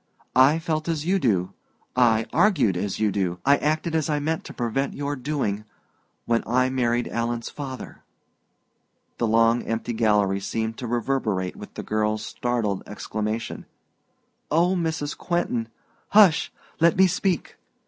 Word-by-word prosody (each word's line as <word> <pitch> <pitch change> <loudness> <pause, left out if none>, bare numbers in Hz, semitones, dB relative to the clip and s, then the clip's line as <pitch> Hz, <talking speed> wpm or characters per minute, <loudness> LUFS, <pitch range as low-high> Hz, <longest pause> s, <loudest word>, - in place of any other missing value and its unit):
I 135 +5 +6
felt 160 -1 -2
as 160 -2 -1
you 190 +2 +2
do, 95 - +1 0.4
I 115 -3 +4
argued 145 - +3
as 95 +2 -2
you 105 -1 +2
do, 90 -3 -1
I 140 +1 +6
acted 155 +2 -1
as 160 -1 0
I 150 - +1
mean 160 +2 -1
to - - -10
prevent 135 +3 -2
your 145 0 -2
doing, 130 -7 -2 0.6
when 115 -1 +2
I 130 +2 +2
married 120 -2 +1
Alan's 115 0 -2
father." 135 -3 -7 1.2
The 115 - +1
long 115 +2 +4
empty 115 +1 -3
gallery 105 -3 +2
seemed 110 +3 -3
to 125 - -4
reverberate 110 -6 -1
with - - -11
the - - -5
girl's 110 0 -1
startled 115 -6 -1
exclamation 110 +2 -4 0.8
"Oh, 175 +4 +3
Mrs. 160 -4 -2
Quentin 170 -10 -1 0.2
" - - -38
"Hush; 190 -7 +6 0.3
let 170 0 +4
me 190 - +7
speak. 180 -2 -1
120 Hz, 150 wpm, -24 LUFS, 110-155 Hz, 1.2 s, me